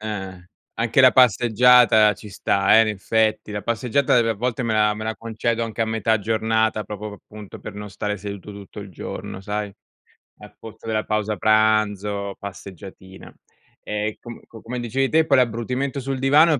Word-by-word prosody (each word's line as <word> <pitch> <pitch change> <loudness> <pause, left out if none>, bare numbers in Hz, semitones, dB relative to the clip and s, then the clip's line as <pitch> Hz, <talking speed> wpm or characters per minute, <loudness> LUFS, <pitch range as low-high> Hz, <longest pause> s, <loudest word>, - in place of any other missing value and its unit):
Eh, 110 - -6 0.2
eh. 90 -1 -14 0.3
Anche 115 +2 +2
la 130 -1 +8
passeggiata 120 -2 +5
ci 105 +1 -12
sta, 100 +2 +2
eh, - - +7
in 110 - 0
effetti. 110 +1 0
La 105 -1 -4
passeggiata 120 +4 +1
ev 115 -1 +3
a 110 - 0
volte, 125 +3 -2
me 115 -2 -1
la 105 -1 +3
me 110 - -7
la 110 -1 -3
concedo 115 +1 -2
anche 115 0 -7
a - - +1
metà 110 0 0
giornata, 110 0 0
proprio, 105 0 -7
p - - -37
appunto, 105 -2 -11
per 105 - -9
non 105 0 -8
stare 105 +1 -3
seduto 100 0 -8
tutto 100 +1 -11
il 100 - -9
giorno, 95 +2 -7
sai, 105 0 -4 0.7
al - - -14
pozzo 110 0 -12
della 110 -1 -1
pausa 105 -1 -2
pranzo, 105 -2 +1
passeggiatina. 95 -1 -11 0.5
Ehm, 105 +1 -3
com 120 -1 -10
co 115 - -14
come 125 +2 -5
dicevi 130 +3 -1
te, 160 0 +3
poi 140 -3 +3
l'abbrutimento 125 +3 -1
sul 135 0 -4
divano, 150 +2 +4
110 Hz, 185 wpm, -22 LUFS, 105-115 Hz, 0.7 s, la